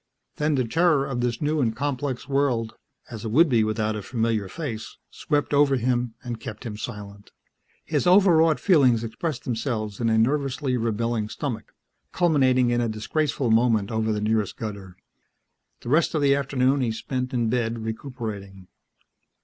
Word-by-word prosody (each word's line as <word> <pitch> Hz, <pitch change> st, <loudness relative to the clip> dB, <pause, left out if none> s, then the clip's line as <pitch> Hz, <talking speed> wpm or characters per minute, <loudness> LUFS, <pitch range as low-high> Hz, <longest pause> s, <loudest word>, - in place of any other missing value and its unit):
Then 150 Hz, 0 st, +1 dB
the 130 Hz, -3 st, 0 dB
terror 160 Hz, 0 st, +3 dB
of 125 Hz, -3 st, -3 dB
this 120 Hz, +2 st, -1 dB
new 150 Hz, 0 st, +1 dB
and 115 Hz, -3 st, 0 dB
complex 135 Hz, 0 st, -3 dB
world 135 Hz, -5 st, 0 dB, 0.4 s
as 110 Hz, -3 st, -7 dB
it 110 Hz, -, -3 dB
would 160 Hz, +10 st, +5 dB
be 120 Hz, -6 st, +3 dB
without 110 Hz, 0 st, -1 dB
a 105 Hz, -, -4 dB
familiar 110 Hz, -2 st, -1 dB
face 120 Hz, -, -6 dB
swept 145 Hz, 0 st, -1 dB
over 140 Hz, -1 st, +4 dB
him 120 Hz, -1 st, -1 dB
and 120 Hz, -2 st, -5 dB
kept 110 Hz, +3 st, -8 dB
him 110 Hz, -3 st, -5 dB
silent. 100 Hz, -1 st, -8 dB, 0.6 s
His -, -, 0 dB
overwrought 165 Hz, -6 st, +5 dB
feelings 130 Hz, -, +4 dB
expressed 125 Hz, +4 st, -4 dB
themselves 110 Hz, -4 st, -3 dB
in 115 Hz, -, +1 dB
a 110 Hz, -, +2 dB
nervously 135 Hz, +2 st, +1 dB
rebelling 115 Hz, -1 st, -1 dB
stomach, 115 Hz, -3 st, -5 dB, 0.4 s
culminating 130 Hz, -7 st, +3 dB
in 120 Hz, 0 st, +1 dB
a 120 Hz, -, 0 dB
disgraceful 125 Hz, +3 st, -1 dB
moment 110 Hz, -2 st, +2 dB
over 110 Hz, 0 st, 0 dB
the 105 Hz, -, -1 dB
nearest 110 Hz, -1 st, 0 dB
gutter. 100 Hz, -4 st, -7 dB, 0.8 s
The -, -, -7 dB
rest 155 Hz, +4 st, +2 dB
of 150 Hz, -, +1 dB
the 140 Hz, -1 st, +5 dB
afternoon 135 Hz, -1 st, +1 dB
he 120 Hz, -3 st, 0 dB
spent 125 Hz, +3 st, -4 dB
in 120 Hz, -3 st, 0 dB
bed 115 Hz, -2 st, -1 dB
recuperating. 110 Hz, -6 st, -6 dB
120 Hz, 165 wpm, -24 LUFS, 110-140 Hz, 0.8 s, would